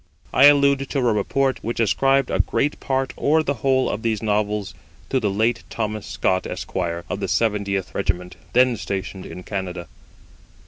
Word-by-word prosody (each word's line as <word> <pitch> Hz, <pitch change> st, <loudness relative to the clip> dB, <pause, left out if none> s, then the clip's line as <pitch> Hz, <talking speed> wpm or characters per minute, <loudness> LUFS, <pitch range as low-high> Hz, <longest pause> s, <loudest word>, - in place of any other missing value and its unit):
I 140 Hz, -, +7 dB
allude 140 Hz, -1 st, +5 dB
to -, -, -2 dB
a -, -, +2 dB
report 130 Hz, +6 st, 0 dB
which 115 Hz, +2 st, -3 dB
ascribed 135 Hz, +5 st, +2 dB
a -, -, 0 dB
great 145 Hz, +1 st, 0 dB
part, 135 Hz, 0 st, -1 dB
or 155 Hz, +2 st, +2 dB
the 140 Hz, -, 0 dB
whole, 130 Hz, -1 st, +2 dB
of 105 Hz, -, -3 dB
these 110 Hz, -2 st, -1 dB
Novels 105 Hz, -1 st, -1 dB, 0.4 s
to 130 Hz, -, +2 dB
the 105 Hz, -4 st, 0 dB
late 115 Hz, +4 st, +1 dB
Thomas 110 Hz, -2 st, -3 dB
Scott, 95 Hz, -1 st, 0 dB
Esq., -, -, -7 dB
of 85 Hz, 0 st, -2 dB
the -, -, -2 dB
70th 100 Hz, -4 st, 0 dB
Regiment, 90 Hz, +1 st, -2 dB, 0.2 s
then 125 Hz, -1 st, +4 dB
stationed 95 Hz, -1 st, -5 dB
in 90 Hz, -, -9 dB
Canada. 90 Hz, -4 st, -5 dB
110 Hz, 170 wpm, -22 LUFS, 100-135 Hz, 0.4 s, I